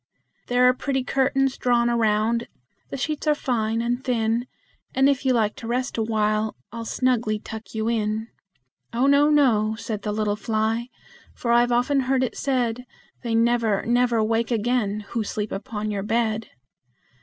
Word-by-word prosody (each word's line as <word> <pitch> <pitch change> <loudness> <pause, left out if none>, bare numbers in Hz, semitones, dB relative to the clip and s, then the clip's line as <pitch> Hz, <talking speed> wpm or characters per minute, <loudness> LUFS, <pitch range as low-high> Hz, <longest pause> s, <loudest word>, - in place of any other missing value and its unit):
"There 245 0 +2
are 250 - +5
pretty 265 0 -2
curtains 270 +1 +1
drawn 240 -1 +2
around; 230 0 +1 0.4
the - - -5
sheets 305 +3 -3
are 300 - +4
fine 230 -4 -1
and 245 +2 -1
thin, 235 -1 0 0.5
And 265 +1 +4
if 275 -1 +1
you 260 - +4
like 220 -3 +1
to 225 - -7
rest 250 +2 -1
a 225 - 0
while, 215 -1 0 0.2
I'll 230 +1 -6
snugly 235 -4 0
tuck 220 -1 -9
you 220 0 -1
in!" 220 0 -1 0.6
"Oh 240 +3 +2
no, 280 +1 +5
no," 225 -8 +3
said 215 -2 -5
the 210 - -3
little 210 -1 0
fly, 220 +2 -1 0.5
"for 235 - -2
I've 240 +1 +4
often 250 +4 +2
heard 260 0 +1
it 255 - -2
said, 250 -3 -1 0.4
They 235 -2 -1
never, 230 -3 +2
never 240 -1 +2
wake 225 +1 0
again 225 -3 0
who 230 -2 -1
sleep 210 0 -4
upon 210 +1 -4
your 200 -1 -2
bed!" 220 +1 -1
235 Hz, 165 wpm, -24 LUFS, 220-250 Hz, 0.6 s, are